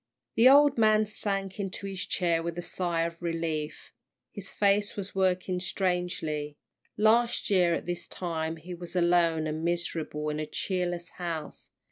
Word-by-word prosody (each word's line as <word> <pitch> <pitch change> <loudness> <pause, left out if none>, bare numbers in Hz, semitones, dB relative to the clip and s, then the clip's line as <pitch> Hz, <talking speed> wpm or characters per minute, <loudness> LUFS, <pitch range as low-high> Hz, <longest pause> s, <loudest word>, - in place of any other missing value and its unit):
The 235 +3 +7
old 285 -1 +6
man 215 -1 +5
sank 195 -2 -3
into 195 0 -4
his 195 -2 -4
chair 170 -2 +1
with 170 0 -4
a 175 - -3
sigh 170 -2 -1
of 170 0 -4
relief. 165 -3 -3 0.4
His 195 -1 -7
face 205 0 +2
was 200 -1 -5
working 185 -1 +1
strangely. 180 -6 -2 0.4
Last 230 +2 +3
year 175 -3 +4
at - - -5
this 175 0 -3
time 160 -2 -3
he 175 +3 -8
was 175 +1 -9
alone 170 -2 +3
and 155 +1 -3
miserable 165 -3 -2
in 150 0 -2
a 155 - -3
cheerless 175 +1 -2
house. 170 -3 -5
175 Hz, 155 wpm, -28 LUFS, 165-195 Hz, 0.4 s, The